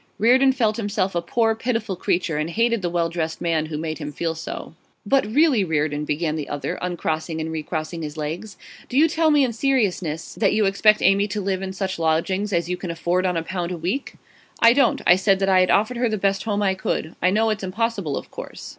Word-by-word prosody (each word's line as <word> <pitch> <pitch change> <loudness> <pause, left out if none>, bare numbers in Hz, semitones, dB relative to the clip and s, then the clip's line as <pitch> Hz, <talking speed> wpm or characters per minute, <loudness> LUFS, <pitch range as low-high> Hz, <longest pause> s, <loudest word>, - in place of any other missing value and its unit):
Reardon 255 +5 +5
felt 225 -4 0
himself 205 -3 -1
a 170 - 0
poor, 225 +6 +1
pitiful 225 -3 -2
creature, 175 -3 -1
and 155 +2 -2
hated 230 +4 +1
the 175 - -1
well 170 -1 0
dressed 165 -1 -3
man 160 -2 0
who 155 -1 -5
made 155 0 -4
him 150 -1 -5
feel 165 +2 -2
so. 160 - -7 0.3
'But 270 -5 +2
really, 270 -1 +3
Reardon,' 150 -3 -1
began 155 +1 -1
the 155 -2 -5
other, 145 - -4
uncrossing 160 -2 -2
and 160 0 -3
recrossing 160 +1 -4
his 150 0 -6
legs, 165 +7 -5 0.3
'do 255 - -2
you 315 +3 +6
tell 320 0 +2
me 295 -2 +4
in 245 -3 0
seriousness 205 - -1
that 200 - +1
you 215 -1 +2
expect 210 +2 +3
Amy 195 +2 +4
to 210 +1 -3
live 190 -1 -2
in 190 -1 -4
such 190 -2 -3
lodgings 175 +6 0
as 170 -2 0
you 180 0 -2
can 180 0 -6
afford 175 +2 0
on 180 -2 0
a 165 - -1
pound 175 0 -4
a 180 - -3
week?' 185 - -3 0.4
'I 230 0 +7
don't. 270 -2 +2
I 180 - +7
said 195 +1 +2
that 195 0 0
I 190 -1 +5
had 185 - +3
offered 220 +5 +2
her 240 -1 +1
the 215 - -1
best 195 +1 0
home 205 -2 0
I 190 -1 +2
could. 180 -3 -3
I 180 - +4
know 220 +3 +2
it's 215 - -3
impossible, 200 -5 -2
of - - -8
course. - - -8
190 Hz, 235 wpm, -22 LUFS, 165-220 Hz, 0.4 s, I